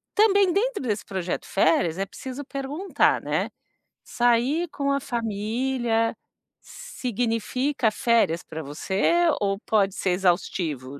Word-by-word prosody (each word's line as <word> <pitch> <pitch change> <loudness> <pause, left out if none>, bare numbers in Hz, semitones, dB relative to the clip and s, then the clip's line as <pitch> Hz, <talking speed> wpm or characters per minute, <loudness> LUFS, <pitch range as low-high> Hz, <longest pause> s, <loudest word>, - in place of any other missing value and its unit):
também, 405 -3 +5
dentro 465 - 0
desse 215 -5 -2
projeto 185 -3 -3
férias, 170 -1 +2
é 195 - 0
preciso 260 +7 -7
perguntar, 280 +7 0
né. - - -1 0.5
Sair 245 +8 +1
com 280 -2 -1
a 280 - +1
família 230 0 -1 0.5
significa 245 - -2
férias 220 -7 +1
pra 160 0 -7
você? 190 - 0 0.3
Ou 195 -1 +1
pode 200 -3 +2
ser 185 - 0
exaustivo? 165 -7 -1
230 Hz, 115 wpm, -25 LUFS, 195-275 Hz, 0.5 s, também